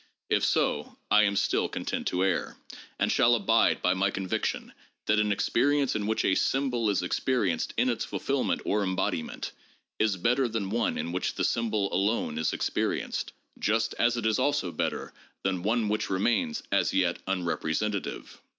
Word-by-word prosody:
If - - +3
so, - - 0
I 105 0 +6
am 100 0 +1
still - - +1
content - - -3
to 90 +1 +1
err; 95 - -1 0.4
and - - +1
shall - - +4
abide - - +2
by 90 - +4
my 100 +2 +1
conviction 95 -1 -3 0.3
that 105 0 +3
an 105 -1 +2
experience 140 +7 +2
in 105 -1 -1
which 110 - 0
a - - +3
symbol 125 -2 +1
is 100 - +1
experienced 95 -3 0
in - - +3
its - - 0
fulfillment - - -1
or 105 - +1
embodiment, 95 -4 -2 0.5
is 110 -3 +2
better 125 +7 +2
than 110 -4 -3
one 115 +1 0
in 85 - -3
which 90 - -2
the - - -1
symbol 110 -4 0
alone 100 -6 0
is 80 - +1
experienced, - - -2 0.3
just 115 +1 +1
as 120 +1 +3
it 115 - -3
is 110 +2 +2
also 135 -9 +1
better 80 - -3 0.3
than 95 -2 0
one 110 +3 +1
which 105 +1 -1
remains 120 - 0
as 100 - +2
yet 90 -2 +1
unrepresentative. 95 +2 -2
105 Hz, 170 wpm, -28 LUFS, 95-115 Hz, 0.5 s, I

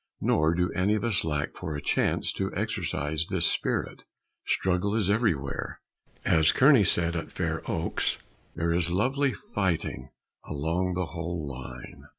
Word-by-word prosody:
Nor 80 +2 +2
do 90 +2 +1
any 100 +3 +2
of 110 - -2
us 110 -7 +1
lack 75 -1 -2
for 80 -4 -5
a - - -3
chance - - +1
to - - -2
exercise 75 +2 -1
this - - 0
spirit. - - -1 0.4
Struggle 95 +3 +1
is 100 -3 +2
everywhere; 90 - -1 0.5
as 80 -1 +5
Kearny 135 -4 +6
said 85 -2 +1
at 85 - -4
Fair - - -2
Oaks, - - 0 0.4
"There 85 0 0
is 85 0 +1
lovely 130 +9 +2 0.2
fighting 80 -8 -1 0.3
along 85 +5 -1
the 90 0 0
whole 85 0 -4
line." 65 -2 -9
85 Hz, 150 wpm, -28 LUFS, 80-95 Hz, 0.5 s, Kearny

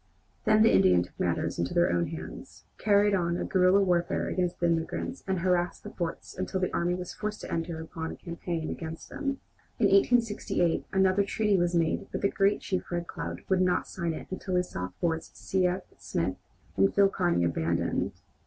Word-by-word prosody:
Then 215 -1 +5
the 225 - +5
Indians 90 -1 +5
took - - -21
matters - - -1
into 85 - -1
their 175 0 +4
own 85 -1 +1
hands, - - -8 0.2
carried 205 0 +4
on 170 -2 +1
a - - -2
guerilla 185 +1 +4
warfare 175 -2 +1
against 180 -1 0
immigrants, 170 +10 -1
and 190 -2 0
harassed 180 -1 +1
the - - -8
forts 170 -2 -5
until 185 0 -2
the 185 - -1
army 175 +1 +1
was 180 -1 -6
forced 210 0 -4
to - - -7
enter 165 0 -2
upon 160 0 -5
a - - -7
campaign 170 -1 -4
against 160 -1 -7
them. 275 -2 -3 0.4
In - - +3
1868 230 - +2
another 190 +1 +3
treaty 210 +1 +1
was 175 -1 +1
made, 165 -1 +1
but - - -3
the 200 - +3
great 200 +1 +2
chief, 185 -2 -3
Red 175 0 -1
Cloud, - - -6
would 190 -1 +2
not 180 -1 +2
sign 170 -3 -2
it - - -7
until 185 0 -3
he 180 - +3
saw 90 - -5
forts 165 -1 -1
C. 185 -1 +1
F. 180 +1 -2 0.2
Smith - - -2 0.4
and 95 0 +4
Phil 200 0 +6
Kearney 175 - +1
abandoned. 85 0 0
180 Hz, 190 wpm, -28 LUFS, 165-195 Hz, 0.4 s, Phil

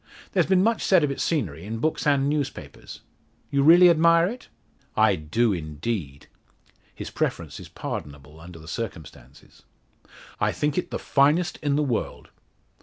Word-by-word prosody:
"There's - - +1
been 190 -1 +3
much 225 +1 +1
said 185 -5 +4
of 145 - +1
its 140 - -4
scenery 90 - -2
in 110 +3 -5
books 155 +5 -1
and 140 -1 +3
newspapers. 145 -2 -5 0.5
You 140 - +2
really 170 +5 +7
admire 170 0 +5
it?" 240 +7 -6 0.5
"I 110 -2 +4
do, 100 +8 0
indeed." 80 -2 -5 0.7
His - - -7
preference - - -3
is - - -11
pardonable 75 +1 -7
under 85 +1 -12
the 80 0 -14
circumstances. 80 - -9 0.8
"I - - +1
think 150 -1 -1
it 180 - -2
the - - -3
finest 150 +5 +2
in 145 -2 0
the 150 - +1
world." 125 -6 -3
135 Hz, 155 wpm, -24 LUFS, -, 0.8 s, really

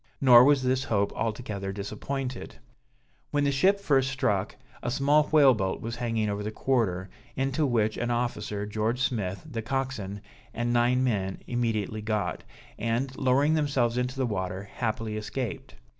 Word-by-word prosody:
Nor 125 -3 +8
was 140 -2 +4
this 130 +1 +1
hope 100 -2 0
altogether 105 -3 -3
disappointed. 120 +6 -5 0.7
When 145 0 +1
the 140 - +2
ship 190 +9 +3
first 135 -8 +2
struck, 105 -8 0 0.3
a 120 - -2
small 140 +4 +3
whale 145 -4 +6
boat 95 -4 -2
was 115 +1 -5
hanging 115 -3 -1
over 100 0 -2
the 105 - -3
quarter, 105 -6 0 0.3
into 135 +3 0
which, 110 -3 +1
an 120 - -2
officer, 110 -4 -2
George 110 +3 -1
Smith 105 -3 -2
the 120 -7 -4
coxswain, 110 -5 -3 0.3
and 120 +1 0
nine 120 +2 +3
men, 100 -6 -1
immediately 110 -3 -1
got, 105 -1 -2 0.4
and, 120 +4 -1
lowering 135 +4 +3
themselves 140 -6 +1
into 125 +1 -1
the 130 - +1
water, 95 -3 -3
happily 110 -2 -2
escaped. 110 0 -5
120 Hz, 155 wpm, -27 LUFS, 105-135 Hz, 0.7 s, Nor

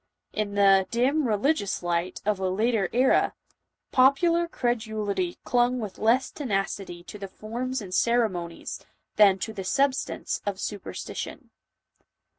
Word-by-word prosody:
In 210 -1 -2
the 195 -1 +5
"dim, 265 +5 +2
re 215 - +2
ligious 205 - 0
light" 175 +1 -2
of 210 -2 +1
a 190 -1 0
later 210 0 +1
era, 255 +3 +3 0.6
popular 335 +7 +4
credulity 235 - -2
clung 245 +1 +2
with 210 -4 -6
less 235 +5 +2
tenacity 195 - -3
to 210 - -10
the 195 - -5
forms 240 +5 -4
and 185 -2 -8
ceremonies, 190 -8 0 0.3
than 200 -3 +6
to 220 +3 -4
the 195 -3 -5
substance 270 +8 0
of 200 -2 -3
superstition. 205 -2 -6
215 Hz, 130 wpm, -26 LUFS, 195-255 Hz, 0.6 s, than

